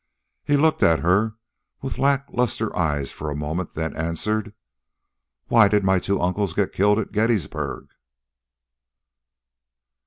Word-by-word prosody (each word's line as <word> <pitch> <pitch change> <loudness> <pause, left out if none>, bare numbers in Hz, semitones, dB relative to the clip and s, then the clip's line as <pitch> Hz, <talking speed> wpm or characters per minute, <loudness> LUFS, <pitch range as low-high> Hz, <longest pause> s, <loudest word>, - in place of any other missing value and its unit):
He 145 - +2
looked 160 +2 +2
at 80 -1 +4
her 100 +6 +2 0.5
with 135 - -4
lackluster 135 -5 0
eyes 75 -6 -1
for 75 - -6
a 75 - -4
moment, 80 +4 -4
then 80 0 -3
answered 105 +6 -2 0.9
"Why 115 -3 +6
did 105 0 +2
my 95 -1 +3
two 100 +2 -1
uncles 90 0 -1
get 100 -2 0
killed 105 +2 +3
at 110 - -3
Gettysburg?" 105 -6 -1
100 Hz, 125 wpm, -23 LUFS, 85-110 Hz, 0.9 s, Why